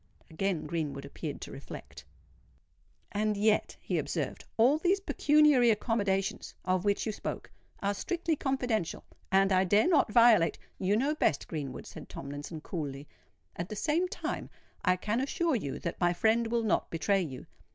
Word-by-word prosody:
Again 180 0 -1
Greenwood 150 -3 -3
appeared 140 - -6
to - - -7
reflect. - - -10 1.1
"And 210 0 0
yet," 215 +1 +2
he - - -1
observed, - - -3
"all 255 +7 +5
these 370 +4 +2
pecuniary 300 -9 +4
accommodations 205 -3 0
of 185 0 +1
which 205 -1 +1
you 220 - -1
spoke, - - -6 0.3
are 200 +1 +1
strictly 340 - -1
confidential; 250 - -1 0.3
and 195 0 +4
I 185 0 +4
dare 205 - +4
not 300 - +3
violate——" 230 -6 +5 0.2
"You 200 +2 +2
know 280 +6 +1
best, 155 - +1
Greenwood," 140 -5 -5
said - - -10
Tomlinson, 145 +3 -7
coolly. 145 -4 -5 0.5
"At 170 +2 -4
the 215 - -5
same 320 - +1
time, - - -4 0.3
I 180 -1 +4
can 210 +6 -1
assure 330 +3 0
you 145 - -3
that 170 +1 -5
my 175 0 +3
friend 225 +5 +2
will 230 0 0
not 220 - +1
betray 195 +4 +1
you. 135 -7 -6
205 Hz, 160 wpm, -30 LUFS, 175-245 Hz, 1.1 s, all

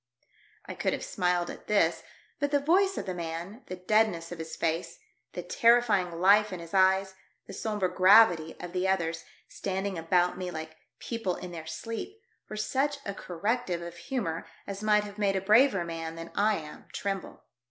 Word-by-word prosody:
I - - -6
could - - -1
have - - -4
smiled 180 -1 0
at - - -12
this, 165 -6 +2 0.4
but 285 0 0
the 285 0 +3
voice 380 +7 +2
of - - -3
the 185 - -3
man, 170 +6 -6
the 185 - -5
deadness 180 -3 +1
of 175 - -7
his 160 0 -6
face, 165 +1 -2 0.4
the - - -5
terrifying 225 -8 +3
life 205 +3 +5
in 185 - -5
his 170 +1 -10
eyes, 190 0 +3 0.3
the - - -10
sombre 210 -4 -1
gravity 180 -3 +5
of 180 -1 -7
the 185 +1 0
others, 165 -3 0 0.2
standing 190 -1 -3
about 180 +2 +1
me 180 -1 -3
like 160 -2 -7 0.2
people 225 -7 -3
in 180 - -8
their 160 -2 -8
sleep, 230 - -6 0.3
were 215 - -6
such 275 +6 0
a 200 - -3
corrective 185 0 -2
of 170 0 -8
humour 170 -4 -3 0.2
as 200 0 -6
might 210 -1 +3
have 205 0 -9
made 200 -2 +2
a - - +2
braver 210 -1 +4
man 165 -1 -5
than 165 0 -8
I 210 +1 +2
am 155 -4 -8
tremble. 195 -2 -4
190 Hz, 185 wpm, -29 LUFS, 170-215 Hz, 0.4 s, life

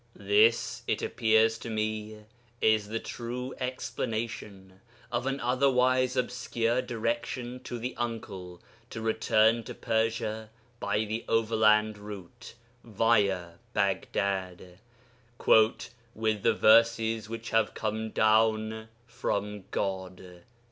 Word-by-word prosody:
This, 430 +2 +3
it - - -1
appears 110 -1 +2
to 120 - -7
me, 110 -1 -3 0.4
is 110 -1 +3
the 110 +2 -3
true 125 +3 -5
explanation 110 -6 -5 0.3
of 120 +2 -1
an 135 +1 -1
otherwise 130 0 +2
obscure 125 -1 0
direction 120 +1 -3
to 120 - -5
the 125 +2 -5
uncle 100 -7 -5 0.3
to 110 - -6
return 110 0 +2
to - - -7
Persia 110 -1 -1 0.3
by 105 +2 0
the 110 +2 -4
overland 110 -1 +3
route, 105 +3 -10 0.3
via 100 -6 +1 0.2
Baghdad, 95 -2 -1 0.7
'with 110 -1 +2
the 115 - +3
verses 115 0 +4
which 115 0 -6
have 110 -1 +2
come 110 0 -2
down 110 0 +2 0.2
from 105 -4 -3
God.' 95 -2 -4
110 Hz, 105 wpm, -29 LUFS, 105-115 Hz, 0.7 s, verses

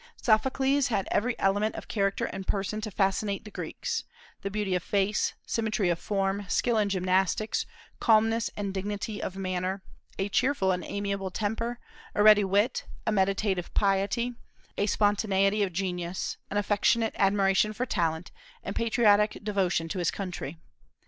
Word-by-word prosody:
Sophocles 265 +5 +2
had 205 -6 -1
every 240 +3 +1
element 205 +3 +1
of - - -7
character 195 -2 0
and 190 - -6
person 205 +2 -1
to 215 - -4
fascinate 195 +1 0
the 210 - -9
Greeks, 475 - -4 0.4
beauty 200 -1 -2
of 180 - +1
face, 200 +3 0
symmetry 215 -4 0
of 170 -1 0
form, 195 0 -1
skill 235 +2 +2
in 205 -1 +1
gymnastics, 190 +3 +1 0.3
calmness 225 0 +3
and 200 -2 -3
dignity 205 +2 -3
of 185 - -4
manner, 185 0 -2 0.3
a 195 - 0
cheerful 245 -3 +2
and 180 -1 -1
amiable 200 -1 -3
temper, 225 +5 -2 0.4
a 205 - +3
ready 210 -1 +8
wit, 200 +4 +1 0.2
a 220 - +1
meditative 195 -2 0
piety, 205 +5 +1 0.4
a 205 - 0
spontaneity 205 -1 +2
of 195 -2 +1
genius, 180 -1 -3
an 205 - -2
affectionate 210 +2 +2
admiration 195 +1 +3
for 240 +4 -2
talent, 165 -5 -1 0.3
and - - -5
patriotic 215 -2 +3
devotion 190 -5 0
to 180 - -4
his 175 - +1
country. 180 -5 -5
200 Hz, 150 wpm, -28 LUFS, 190-215 Hz, 0.4 s, ready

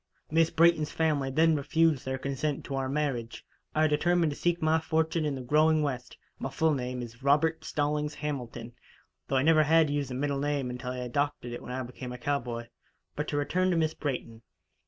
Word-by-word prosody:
Miss 165 0 +4
Brayton's 165 -2 +3
family 150 -4 +1
then 160 +4 +3
refused 160 0 +2
their 130 0 -2
consent 140 +2 -2
to 140 - -6
our 135 -1 -1
marriage. 135 -6 -2 0.3
I 155 0 +4
determined 165 +2 +2
to - - -5
seek 175 +2 0
my 160 0 +3
fortune 160 0 0
in 145 -2 -1
the 130 - -5
growing 155 +4 +3
West. 125 -4 -4 0.2
My 135 - -3
full 155 +4 +2
name 125 -2 -3
is 120 +1 -11
Robert 155 +4 +2
Stallings 150 0 -1
Hamilton, 125 -5 -5 0.5
though 135 - -1
I 130 - +3
never 155 0 +5
had 155 0 +4
used 145 -2 -1
the 125 - -4
middle 140 +1 -1
name 140 -3 -1
until 125 0 -5
I 130 - -5
adopted 125 0 -2
it - - -6
when - - -8
I 130 +1 -3
became 125 0 -8
a 125 - -6
cowboy. 120 -4 -3 0.5
But 150 - -3
to 145 - -2
return 180 +6 +1
to 175 - +2
Miss 160 -1 +1
Brayton. 125 -5 -4
145 Hz, 200 wpm, -29 LUFS, 130-155 Hz, 0.5 s, never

